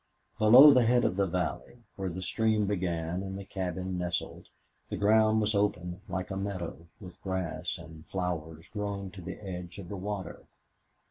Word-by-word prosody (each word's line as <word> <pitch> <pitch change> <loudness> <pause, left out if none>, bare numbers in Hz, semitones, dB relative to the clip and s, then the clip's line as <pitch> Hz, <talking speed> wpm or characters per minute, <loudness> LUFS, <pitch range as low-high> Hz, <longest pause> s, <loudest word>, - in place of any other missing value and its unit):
Below 125 +7 +10
the 130 - +5
head 120 +1 +3
of - - +1
the 100 0 +2
valley, 90 +7 -3
where 95 -1 -3
the 90 +2 -5
stream 110 0 +1
began 90 -3 -1
and 95 0 -5
the 100 - -7
cabin 95 -1 -3
nestled, 90 -1 -3 0.4
the - - -3
ground 110 +1 +4
was 105 +1 +1
open, 95 -3 0
like 95 +1 -3
a - - -2
meadow, 95 -4 -4
with 90 -4 -11
grass 95 -4 -3
and 80 0 -12
flowers 85 -3 -4
growing 100 -2 -4
to 95 - -10
the - - -7
edge 90 -4 -7
of 95 -3 -8
the 100 - -5
water. 95 -2 -5
95 Hz, 175 wpm, -30 LUFS, 90-105 Hz, 0.4 s, Below